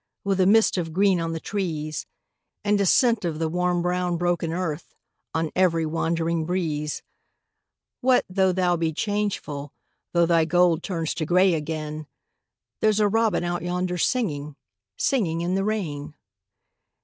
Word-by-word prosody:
With 195 Hz, -1 st, 0 dB
a 185 Hz, -, +4 dB
mist 215 Hz, -2 st, +4 dB
of 165 Hz, -2 st, -4 dB
green 190 Hz, -1 st, +3 dB
on 165 Hz, 0 st, -2 dB
the 165 Hz, -, -3 dB
trees 160 Hz, -6 st, -3 dB, 0.6 s
And 205 Hz, 0 st, +2 dB
a 195 Hz, -, +2 dB
scent 235 Hz, +1 st, +4 dB
of 165 Hz, -3 st, -2 dB
the 160 Hz, 0 st, 0 dB
warm 180 Hz, +1 st, 0 dB
brown 180 Hz, 0 st, 0 dB
broken 175 Hz, -1 st, 0 dB
earth 170 Hz, -2 st, -4 dB, 0.4 s
On 160 Hz, -1 st, 0 dB
every 165 Hz, -3 st, +2 dB
wandering 165 Hz, +1 st, -1 dB
breeze; 155 Hz, -4 st, -2 dB, 1.0 s
What, 255 Hz, 0 st, +3 dB
though 190 Hz, 0 st, +2 dB
thou 180 Hz, -1 st, +1 dB
be 160 Hz, -1 st, -1 dB
changeful, 190 Hz, -8 st, -2 dB, 0.4 s
Though 170 Hz, -1 st, +4 dB
thy 165 Hz, -1 st, +3 dB
gold 175 Hz, 0 st, +3 dB
turns 165 Hz, -4 st, -2 dB
to 160 Hz, -, -3 dB
grey 180 Hz, +1 st, +4 dB
again, 155 Hz, -1 st, -4 dB, 0.7 s
There's 215 Hz, -1 st, +3 dB
a 210 Hz, -, +4 dB
robin 220 Hz, -3 st, +1 dB
out 175 Hz, -1 st, -2 dB
yonder 180 Hz, +1 st, -2 dB
singing, 150 Hz, -, -1 dB, 0.4 s
Singing 175 Hz, -11 st, 0 dB
in 175 Hz, +2 st, -1 dB
the 195 Hz, +1 st, +1 dB
rain. 155 Hz, -9 st, -3 dB
175 Hz, 150 wpm, -24 LUFS, 160-190 Hz, 1.0 s, a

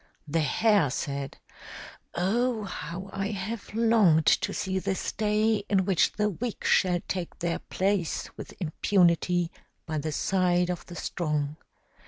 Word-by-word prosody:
The 160 Hz, +3 st, 0 dB
Hare 190 Hz, -, +3 dB
said, 140 Hz, +1 st, -4 dB, 0.8 s
"Oh, 225 Hz, +5 st, +1 dB
how 190 Hz, 0 st, -6 dB
I 195 Hz, 0 st, -1 dB
have 205 Hz, +1 st, -5 dB
longed 215 Hz, -9 st, +4 dB
to -, -, +3 dB
see 190 Hz, 0 st, -1 dB
this 190 Hz, 0 st, -2 dB
day, 215 Hz, +1 st, +2 dB
in 190 Hz, -2 st, +3 dB
which 190 Hz, -3 st, +2 dB
the 210 Hz, 0 st, +1 dB
weak 220 Hz, +4 st, -4 dB
shall 180 Hz, -2 st, +3 dB
take 180 Hz, -2 st, -4 dB
their 170 Hz, -1 st, -1 dB
place 190 Hz, -3 st, -1 dB
with -, -, -9 dB
impunity 175 Hz, 0 st, +2 dB, 0.3 s
by 155 Hz, -2 st, -2 dB
the 155 Hz, +2 st, -3 dB
side 180 Hz, +2 st, +1 dB
of 180 Hz, -, -6 dB
the 175 Hz, -, -9 dB
strong." 150 Hz, -5 st, -2 dB
185 Hz, 140 wpm, -27 LUFS, 165-205 Hz, 0.8 s, longed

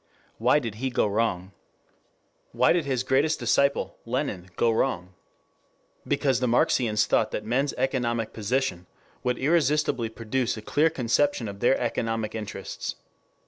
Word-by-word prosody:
Why 125 Hz, +5 st, +4 dB
did 115 Hz, -7 st, -3 dB
he 135 Hz, -, 0 dB
go 125 Hz, -, +1 dB
wrong? 100 Hz, -3 st, -1 dB, 1.0 s
Why 120 Hz, +2 st, +4 dB
did 170 Hz, -3 st, 0 dB
his 130 Hz, -3 st, 0 dB
greatest 140 Hz, +4 st, +2 dB
disciple, 140 Hz, 0 st, +1 dB
Lenin, 115 Hz, -7 st, -3 dB
go 115 Hz, -, +2 dB
wrong? 95 Hz, -6 st, -1 dB, 0.9 s
Because 135 Hz, -4 st, +1 dB
the 125 Hz, -, 0 dB
Marxians 115 Hz, -2 st, +2 dB
thought 110 Hz, -, +2 dB
that 105 Hz, -, -4 dB
men's 130 Hz, +5 st, 0 dB
economic 125 Hz, -3 st, -1 dB
position 110 Hz, -4 st, -1 dB, 0.4 s
would 125 Hz, -1 st, 0 dB
irresistibly 150 Hz, -5 st, +1 dB
produce 115 Hz, +2 st, -2 dB
a 110 Hz, -, -8 dB
clear 155 Hz, +8 st, +2 dB
conception 135 Hz, -3 st, +1 dB
of 100 Hz, -1 st, -7 dB
their 120 Hz, +4 st, +3 dB
economic 115 Hz, -2 st, -2 dB
interests. 105 Hz, -2 st, -5 dB
120 Hz, 140 wpm, -26 LUFS, 110-135 Hz, 1.0 s, Why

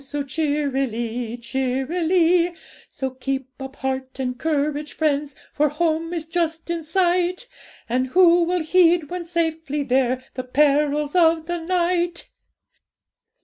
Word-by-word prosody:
so 285 Hz, +1 st, -4 dB
cheerily, 265 Hz, -5 st, -2 dB
cheerily; 330 Hz, +8 st, +1 dB, 0.3 s
So 265 Hz, -1 st, -4 dB
keep 265 Hz, 0 st, -4 dB
up 265 Hz, +1 st, -7 dB
heart 265 Hz, 0 st, -4 dB
and 250 Hz, -1 st, -2 dB
courage, 300 Hz, 0 st, -1 dB
friends! 295 Hz, -2 st, -1 dB, 0.2 s
For 300 Hz, 0 st, +2 dB
home 325 Hz, +2 st, -1 dB
is 335 Hz, -3 st, -3 dB
just 330 Hz, 0 st, -2 dB
in 335 Hz, -1 st, -3 dB
sight; 360 Hz, +5 st, +1 dB, 0.4 s
And 255 Hz, +2 st, 0 dB
who 350 Hz, +4 st, +5 dB
will 355 Hz, -1 st, 0 dB
heed, 340 Hz, -2 st, +3 dB
when 360 Hz, -1 st, -4 dB
safely 325 Hz, -3 st, -1 dB
there, 255 Hz, -1 st, +1 dB
The 255 Hz, -, -4 dB
perils 290 Hz, +2 st, +2 dB
of 330 Hz, -2 st, +3 dB
the 345 Hz, +1 st, -3 dB
night? 350 Hz, 0 st, 0 dB
300 Hz, 125 wpm, -22 LUFS, 265-340 Hz, 0.4 s, who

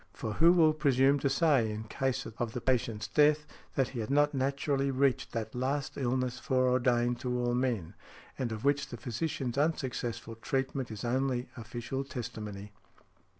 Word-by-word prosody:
For 110 Hz, -, -4 dB
who 165 Hz, +8 st, +6 dB
will 160 Hz, -3 st, +5 dB
presume 140 Hz, -2 st, +3 dB
to 140 Hz, -, +1 dB
say, 140 Hz, -5 st, +3 dB
in 105 Hz, +1 st, -4 dB
case 130 Hz, +3 st, -2 dB
of 115 Hz, 0 st, -4 dB
the -, -, -2 dB
patient's 115 Hz, -4 st, 0 dB
death, 150 Hz, 0 st, +4 dB, 0.3 s
that 135 Hz, -3 st, +2 dB
he 125 Hz, -, -6 dB
had 110 Hz, -, -3 dB
not 145 Hz, +1 st, +3 dB
naturally 140 Hz, +1 st, 0 dB
reached 135 Hz, 0 st, +1 dB
that 115 Hz, -2 st, -3 dB
last 135 Hz, +3 st, -2 dB
illness 130 Hz, -1 st, -1 dB
foreordained 125 Hz, -2 st, +2 dB
to 125 Hz, 0 st, -2 dB
all 120 Hz, 0 st, 0 dB
men, 120 Hz, -9 st, -1 dB, 0.4 s
and 125 Hz, -3 st, -2 dB
of 110 Hz, +3 st, -5 dB
which 140 Hz, 0 st, +2 dB
the 120 Hz, -, -7 dB
physician's 125 Hz, +2 st, -3 dB
unsuccessful 120 Hz, -7 st, -2 dB
treatment 135 Hz, +1 st, -2 dB
is 110 Hz, +1 st, -6 dB
only 130 Hz, 0 st, 0 dB
official 120 Hz, +3 st, -4 dB
testimony? 105 Hz, -6 st, -6 dB
130 Hz, 160 wpm, -31 LUFS, 120-140 Hz, 0.4 s, who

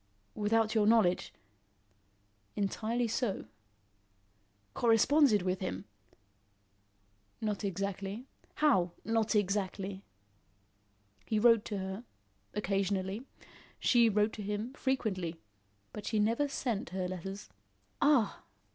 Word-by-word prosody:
"Without 220 Hz, +1 st, +1 dB
your 215 Hz, -2 st, +3 dB
knowledge?" 220 Hz, -6 st, +3 dB, 1.2 s
"Entirely 225 Hz, +4 st, -1 dB
so." 230 Hz, -2 st, -1 dB, 1.3 s
"Corresponded 235 Hz, -1 st, +4 dB
with 185 Hz, 0 st, -1 dB
him?" 100 Hz, -, -4 dB, 1.5 s
"Not 215 Hz, -1 st, -2 dB
exactly." 200 Hz, +3 st, -3 dB, 0.3 s
"How, 190 Hz, -, +3 dB
not 225 Hz, -1 st, +1 dB
exactly?" 195 Hz, -1 st, -1 dB, 1.3 s
"He 220 Hz, -, +1 dB
wrote 230 Hz, 0 st, +5 dB
to 205 Hz, -, -3 dB
her 190 Hz, +3 st, -5 dB, 0.5 s
occasionally. 195 Hz, +2 st, -1 dB, 0.5 s
She 235 Hz, -2 st, +5 dB
wrote 210 Hz, +1 st, +2 dB
to 215 Hz, -, -6 dB
him 210 Hz, +5 st, -3 dB
frequently 195 Hz, -, -2 dB, 0.5 s
but 210 Hz, -, -7 dB
she 220 Hz, -, 0 dB
never 230 Hz, +7 st, +2 dB
sent 240 Hz, -6 st, -2 dB
her 185 Hz, 0 st, -2 dB
letters." 190 Hz, +2 st, -6 dB, 0.5 s
"Ah!" 280 Hz, -7 st, +3 dB
210 Hz, 95 wpm, -32 LUFS, 195-230 Hz, 1.5 s, wrote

